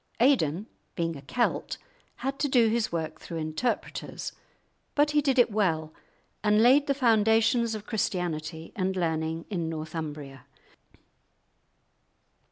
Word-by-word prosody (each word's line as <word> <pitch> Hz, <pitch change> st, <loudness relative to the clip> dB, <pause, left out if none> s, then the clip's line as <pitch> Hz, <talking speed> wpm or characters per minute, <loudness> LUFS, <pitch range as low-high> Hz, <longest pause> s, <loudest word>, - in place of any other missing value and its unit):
Aidan 210 Hz, -, +3 dB, 0.3 s
being 165 Hz, -1 st, -1 dB
a 140 Hz, -, -9 dB
Celt, 240 Hz, -, -1 dB, 0.4 s
had 275 Hz, +1 st, -4 dB
to 290 Hz, -, +2 dB
do 240 Hz, -4 st, +4 dB
his 225 Hz, 0 st, 0 dB
work 160 Hz, -2 st, -3 dB
through 170 Hz, -, -6 dB
interpreters, 155 Hz, +10 st, -3 dB, 0.6 s
but 295 Hz, 0 st, +3 dB
he 295 Hz, 0 st, +3 dB
did 270 Hz, -2 st, +1 dB
it 245 Hz, -2 st, +5 dB
well, 160 Hz, -7 st, 0 dB, 0.5 s
and 210 Hz, +1 st, +4 dB
laid 275 Hz, +4 st, +6 dB
the 275 Hz, -, +2 dB
foundations 225 Hz, -1 st, +3 dB
of 215 Hz, -1 st, -7 dB
Christianity 165 Hz, -7 st, -3 dB
and 190 Hz, -1 st, -1 dB
learning 160 Hz, -2 st, -1 dB
in 170 Hz, -4 st, -1 dB
Northumbria. 150 Hz, -4 st, -6 dB
190 Hz, 125 wpm, -28 LUFS, 160-235 Hz, 0.6 s, laid